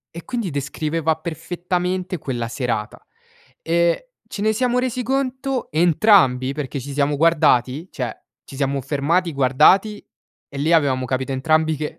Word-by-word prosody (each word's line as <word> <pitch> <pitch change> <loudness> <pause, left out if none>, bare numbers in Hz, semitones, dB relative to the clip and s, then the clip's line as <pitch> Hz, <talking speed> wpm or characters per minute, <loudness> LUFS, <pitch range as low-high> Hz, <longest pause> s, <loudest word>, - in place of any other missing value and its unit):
e 170 - -7
quindi 235 -6 -3
descriveva 155 +2 -2
perfettamente 180 +3 -3
quella 120 -6 -4
serata. 115 -3 -4 0.6
Ehm, 170 +1 +2 0.3
ce 200 - -6
ne 215 +1 +2
siamo 250 +2 +1
resi 250 0 -2
conto 265 +1 -2
entrambi, 155 - +3
perché 140 -1 -4
ci 140 +2 -7
siamo 145 +1 +1
guardati, 150 -2 +2
cioè, 125 -5 -4 0.3
ci - - -12
siamo 140 0 -1
fermati, 150 +6 0
guardati 150 +11 +3 0.5
e 140 - -9
lì 150 +4 0
avevamo 135 -5 +2
capito 130 +2 -2
entrambi 155 +4 +1
che 150 +1 -5
155 Hz, 140 wpm, -21 LUFS, 135-180 Hz, 0.6 s, entrambi